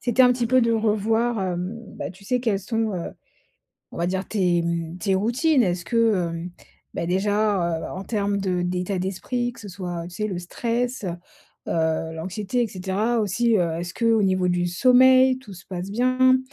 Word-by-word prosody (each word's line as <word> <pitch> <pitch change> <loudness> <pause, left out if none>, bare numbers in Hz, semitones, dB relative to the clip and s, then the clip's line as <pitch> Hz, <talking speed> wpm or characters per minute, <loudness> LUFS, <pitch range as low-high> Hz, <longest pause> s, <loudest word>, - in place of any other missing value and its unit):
c'était 245 0 +3
un 250 -1 +6
petit 245 -1 -1
peu 255 +2 +4
de 230 0 +2
revoir, 225 +1 +1
hem, 185 +5 -3 0.2
bah, - - -4
tu 195 +2 -17
sais, 250 +4 +1
quelles 210 -5 0
sont, 225 +1 -1
heu, 170 -2 -4 0.8
on - - -9
va 170 +1 0
dire 190 +1 -2
tes, 180 -5 +1
mmh, 170 0 -3
tes 190 +1 0
routines. 245 - +2
Est-ce 175 -2 -1
que, 230 -1 +3 0.2
hem, 170 +2 -5 0.5
bah, 170 - -2
déjà, 195 -2 +1
heu, - - -6
en 190 +2 -6
termes 200 -2 -1
de 180 -2 -1
d'état 180 +1 -2
d'esprit, 240 +6 -2
que 235 - -15
ce 205 - -9
soit, 175 -3 -5
tu 175 - -12
sais, 215 0 -1
le 185 -4 -4
stress, 235 +6 -2
heu 175 - -1 0.6
heu 160 0 0
l'anxiété 195 +8 -2
et - - +1
cetera 200 +5 -1
aussi, 220 +3 +2
heu, 170 -2 +1
est-ce 175 0 -5
qu'au 230 -2 +2
niveau 185 -2 +2
du 175 0 +1
sommeil, 255 +6 +5
tout 215 -7 -12
se 175 - -14
passe 185 +1 -5
bien? 255 +3 +3
200 Hz, 195 wpm, -24 LUFS, 180-235 Hz, 0.8 s, un